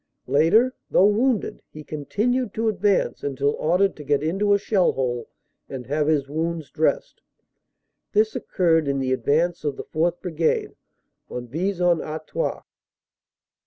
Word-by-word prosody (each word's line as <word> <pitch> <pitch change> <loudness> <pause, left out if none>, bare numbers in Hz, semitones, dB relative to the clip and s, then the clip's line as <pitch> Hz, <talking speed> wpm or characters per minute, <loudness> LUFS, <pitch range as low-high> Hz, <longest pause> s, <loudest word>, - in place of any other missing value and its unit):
Later, 165 - +4 0.2
though 190 - +5
wounded, 230 +1 0
he 155 - -10
continued 210 - -1
to 225 +1 0
advance 205 -2 0
until 140 0 0
ordered 180 +5 +2
to 150 - -8
get 145 0 +1
into 195 +6 +1
a 200 - +6
shell 195 -2 +2
hole 120 -3 -2 0.4
and 130 -2 -6
have 145 +4 0
his 150 -3 +1
wounds 160 +1 -3
dressed. 160 0 -1 0.9
This 215 +1 +2
occurred 165 -5 +1
in 140 0 0
the 130 -1 0
advance 165 +6 +1
of 145 -3 -2
the - - -5
4th 170 +2 -1
Brigade 165 -3 -1 0.5
on 125 0 -5
Vis 180 +8 -2
en 175 -2 +3
Artois. 155 - -4
165 Hz, 145 wpm, -23 LUFS, 145-200 Hz, 0.9 s, a